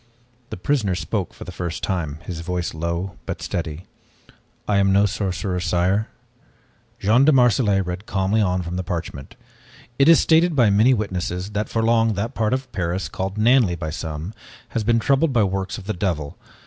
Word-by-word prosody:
The - - -6
prisoner 105 -3 0
spoke 90 +1 -3
for - - -11
the 90 - -8
first 85 0 -5
time, 80 -6 -2
his 85 -3 -5
voice 90 +1 -3
low 85 +2 -3
but - - -4
steady. 85 0 -4 0.8
"I 105 - +2
am 100 0 +3
no 100 +1 +4
sorcerer, 95 -2 -2
sire." 90 +5 +1 0.9
Jean 115 +6 +3
de 155 - +6
Marselait 120 -7 +3
read 90 +4 -5
calmly 100 +3 +1
on 90 -2 0
from 85 +1 -4
the 90 - -2
parchment. 85 -6 -6 0.6
"It 140 +3 +6
is 165 - +8
stated 165 0 +3
by 120 -6 +4
many 110 +6 +5
witnesses 95 -2 -3
that 105 +1 -2
for 115 - 0
long 115 -1 +3
that 100 +4 -3
part 110 -1 0
of 130 -1 -6
Paris, 90 -2 -2
called 95 +2 -4
Nanley 115 -4 +4
by 80 -2 -5
some, 80 +4 -5 0.4
has 115 - -2
been 115 +2 +3
troubled 140 +4 +2
by 115 -4 +4
works 95 -2 -2
of 100 - -10
the 110 - -2
devil. 85 -6 -2
95 Hz, 185 wpm, -22 LUFS, 90-110 Hz, 0.9 s, is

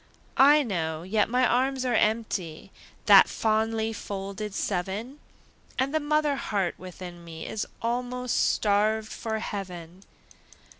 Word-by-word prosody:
I 295 +2 +7
know, 160 - -2
yet 210 +3 +1
my 250 +1 +3
arms 260 +2 +1
are 250 - +1
empty, 215 -8 -1 0.3
That - - +8
fondly 220 0 0
folded 200 0 -5
seven, 205 +9 -3 0.6
And 265 +2 0
the 315 - +2
mother 300 -1 +1
heart 195 -8 -1
within 180 -1 -9
me 160 -1 -8
Is 215 - -3 0.2
almost 250 +1 -2
starved 215 +1 +1
for 220 -1 -3
heaven. 180 -4 -6
215 Hz, 120 wpm, -27 LUFS, 190-250 Hz, 0.6 s, That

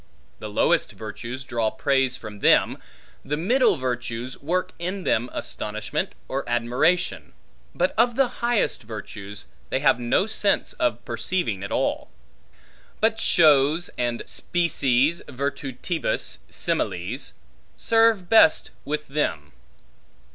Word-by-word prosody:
The 105 - -6
lowest 105 - +2
virtues 115 +4 -7
draw 115 -3 0
praise 135 +3 +1
from 105 -4 -9
them; - - +4 0.4
the 145 +2 -2
middle 240 - +3
virtues 125 -1 -3
work 180 +6 -1
in 185 +3 -3
them 120 -4 +1
astonishment 105 0 -4
or 135 +1 -2
admiration; 125 +10 +1 0.4
but 285 - +1
of 240 0 +4
the 270 0 +3
highest 235 - +1
virtues, 105 -2 -8 0.2
they 130 - 0
have 135 - +4
no 120 +10 +2
sense 210 -2 +1
of 120 -1 -1
perceiving 115 - -1
at 100 - -6
all. - - -1 0.9
But 220 0 +2
shows, 155 -2 +4
and 120 -1 -1
species 155 -3 +1
virtutibus 135 - -3
similes, 95 +10 -2 0.4
serve 225 -5 +3
best 175 -6 +5
with 150 +1 -3
them. 80 - -2
135 Hz, 115 wpm, -24 LUFS, 115-175 Hz, 0.9 s, best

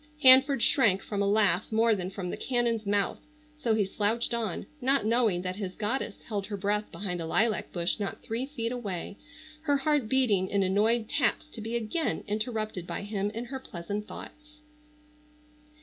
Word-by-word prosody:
Hanford 265 -1 +7
shrank 200 -8 +4
from 205 -1 -2
a 200 - +2
laugh 205 -2 +2
more 225 +1 +4
than 185 -3 -2
from 185 -2 -5
the - - -3
cannon's 235 -4 0
mouth, 200 -1 +1 0.4
so 230 -7 +1
he 210 -2 +2
slouched 215 +5 0
on, 225 -6 -2 0.2
not 270 -1 +3
knowing 220 -6 +2
that 185 +1 -3
his 190 -3 -4
goddess 215 0 -2
held 200 -3 -3
her 205 -1 -4
breath 205 +2 -1
behind 180 0 -3
a - - -3
lilac 220 +5 +1
bush 175 +3 -1
not 200 - -4
three 235 +4 -3
feet 235 -5 -3
away, 200 -6 -4 0.5
her 285 -2 +3
heart 275 -4 +1
beating 220 -8 +3
in 200 -1 +2
annoyed 215 +4 +2
taps 285 +2 +1
to 280 -7 -10
be 225 +2 -3
again 235 +7 -1
interrupted 215 -4 -3
by - - -4
him 205 -1 -2
in 230 +3 -5
her 265 +2 -5
pleasant 205 -2 -5
thoughts. 300 0 -11
215 Hz, 180 wpm, -29 LUFS, 200-240 Hz, 0.5 s, Hanford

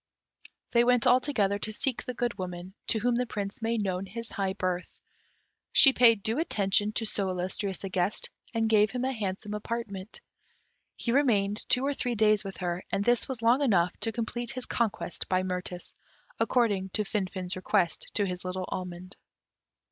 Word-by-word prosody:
They 235 0 +5
went 245 -1 +3
all 250 +1 +6
together 205 -8 0
to 215 - -4
seek 245 +3 -1
the 250 - -5
Good 240 -4 -2
Woman, 180 0 -6
to - - +2
whom 240 +3 +1
the 245 +1 0
Prince 205 0 -4
made 225 -1 0
known 190 0 -2
his 230 +4 -6
high 195 -2 -1
birth. 180 -1 -2 0.9
She 270 - +9
paid 230 -5 +5
due 225 +6 0
attention 205 - +1
to 225 - -1
so 200 -3 -1
illustrious 185 +2 -3
a 195 - -3
guest, 185 +2 -1 0.2
and 225 -2 +1
gave 215 -1 +4
him 250 0 -2
a 265 - 0
handsome 205 -1 -4
apartment. 210 -2 -5 0.8
He 235 - -2
remained 215 -6 +2
two 255 +2 +3
or 285 - +1
three 245 -3 -2
days 215 -1 +3
with 195 -1 -7
her, 175 -1 -3
and 200 - 0
this 240 -1 +3
was 250 -4 -4
long 240 +5 +4
enough 180 -9 +3
to 225 - 0
complete 235 +1 -3
his 255 -1 -5
conquest 220 -6 -2
by 185 0 +2
Mirtis, 180 -1 -5 0.5
according 205 -6 +2
to 215 - +1
Finfin's 185 -3 -2
request 185 -2 0
to 205 - +2
his 180 -1 -4
little 185 0 -3
almond. 180 0 -6
210 Hz, 180 wpm, -28 LUFS, 185-235 Hz, 0.9 s, She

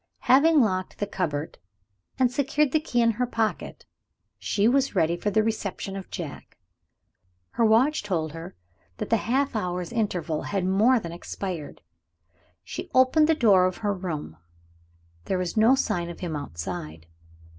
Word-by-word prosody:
Having 300 +3 +5
locked 185 -5 -1
the 205 - -1
cupboard, 160 -7 -3 0.6
and 255 -2 +3
secured 285 +2 +1
the 310 - +3
key 245 -6 0
in 230 - +4
her 245 +3 -1
pocket, 225 -2 -3 0.5
she 205 +1 +1
was 270 -1 +2
ready 170 -2 +2
for 190 +4 -2
the 215 +2 +2
reception 200 -3 -3
of 195 -1 -7
Jack. - - -8 0.9
Her 235 - 0
watch 240 +8 +4
told 165 -7 -2
her 165 +3 -9 0.4
that - - -5
the 230 - +5
half 265 +4 0
hour's 180 -4 -3
interval 180 -8 -1
had 195 -3 -2
more 215 +7 +4
than 170 -6 -7
expired. 175 -2 -6 0.8
She - - -7
opened 260 +5 +5
the 320 - +4
door 200 -9 +5
of 185 - -4
her 205 - +2
room. 160 - -5 0.9
There 190 - -1
was 180 -2 -3
no 225 +4 +5
sign 175 -9 -1
of 170 - -9
him 170 -4 -3
outside. 85 - -6
205 Hz, 155 wpm, -25 LUFS, 175-245 Hz, 0.9 s, Having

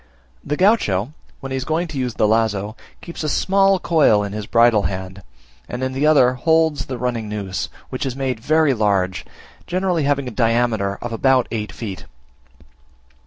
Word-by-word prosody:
The 150 - -3
Gaucho, 150 - +2 0.3
when 135 -1 -7
he - - -1
is 130 - -3
going 160 +5 -1
to 145 -3 -5
use 125 -3 -2
the 105 - +2
lazo, 110 -1 0 0.3
keeps 170 -2 -7
a 155 - -1
small 195 +5 +3
coil 155 - +3
in 100 0 -5
his 105 -1 -5
bridle 115 -2 +4
hand, 95 0 -7 0.5
and 125 +1 -4
in 130 0 -2
the 140 +3 +1
other 130 -5 +5
holds 160 +3 +1
the 130 - -4
running 120 -3 -3
noose 100 -3 -4 0.2
which 130 - -4
is 130 - -4
made 130 -3 -2
very 155 +3 +2
large, 100 -5 0 0.4
generally 180 -4 0
having 140 -2 0
a - - -4
diameter 115 -4 0
of 120 -1 -4
about 130 +2 +2
eight 105 -2 -3
feet. 100 -5 -7
125 Hz, 175 wpm, -20 LUFS, 105-150 Hz, 0.5 s, other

